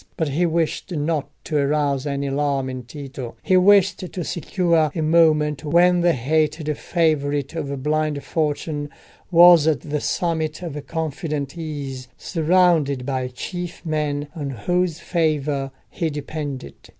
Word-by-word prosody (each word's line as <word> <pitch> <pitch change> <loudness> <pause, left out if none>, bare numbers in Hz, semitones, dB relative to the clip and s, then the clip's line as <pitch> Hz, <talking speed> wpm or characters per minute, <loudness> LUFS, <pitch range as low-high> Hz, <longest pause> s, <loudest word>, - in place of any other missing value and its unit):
But 160 -3 0
he 170 +6 +1
wished 165 +2 -1
not 150 -2 -1
to 155 - -1
arouse 140 -1 +1
any 140 0 -2
alarm 140 -1 0
in 130 -1 -7
Tito: 130 -1 -8
he 190 - +3
wished 195 +1 +5
to 185 -1 -5
secure 170 -1 +1
a 165 - -1
moment 155 -2 +3
when 175 +3 +4
the 175 -1 +4
hated 155 +3 0
favourite 145 -4 0
of 140 -5 -4
blind 150 -1 0
fortune 150 -1 -2 0.4
was 170 -3 +7
at 155 -3 +2
the 150 -1 -3
summit 160 -1 -1
of 150 -4 -6
confident 155 -2 -3
ease, 140 -6 -6
surrounded 160 -6 +2
by 130 -2 -1
chief 175 +9 -6
men 150 -2 -1
on 145 -4 -4
whose 170 - -1
favour 150 -5 0 0.2
he 165 -3 -1
depended. 145 - -5
150 Hz, 140 wpm, -22 LUFS, 140-165 Hz, 0.4 s, was